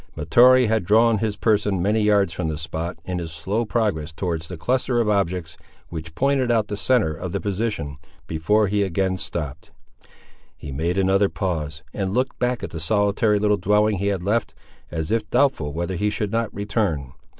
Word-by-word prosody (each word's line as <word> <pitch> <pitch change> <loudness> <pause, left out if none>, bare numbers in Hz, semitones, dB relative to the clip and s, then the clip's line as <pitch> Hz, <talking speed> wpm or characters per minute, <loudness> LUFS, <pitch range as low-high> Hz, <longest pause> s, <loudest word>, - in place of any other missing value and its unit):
Mahtoree 125 - +5
had 110 -2 +1
drawn 110 +3 +4
his 110 -1 -1
person 105 -3 +1
many 105 +5 +1
yards 100 -4 +3
from 90 - -2
the 80 -1 -3
spot, 80 +2 -4
in 90 -1 -3
his 85 -2 -5
slow 105 +8 -2
progress 100 -9 -1
towards 80 -1 -3
the 90 - -7
cluster 125 +6 0
of 115 - +1
objects 90 -5 -1 0.3
which 80 -1 -7
pointed 135 -1 +2
out 110 -3 +1
the 105 - -2
centre 105 -6 +2
of 85 +3 -6
the - - 0
position, 100 -9 -3 0.3
before 85 +7 +1
he 105 +1 +1
again 95 0 0
stopped. 75 -7 -5 0.9
He 75 - -8
made 85 +7 -1
another 95 +1 +3
pause, 80 -4 -3
and 95 0 -2
looked 130 +1 -1
back 125 -1 0
at - - -5
the 80 - -5
solitary 105 +4 +2
little 105 0 +2
dwelling 105 +2 +2
he 100 - -1
had 95 -3 -1
left, 110 +4 0 0.3
as 80 -2 -3
if 115 -1 0
doubtful 125 - +2
whether 85 +4 -3
he 105 +4 0
should 105 -1 -2
not 115 0 -1
return. 100 - -2
100 Hz, 185 wpm, -23 LUFS, 85-110 Hz, 0.9 s, Mahtoree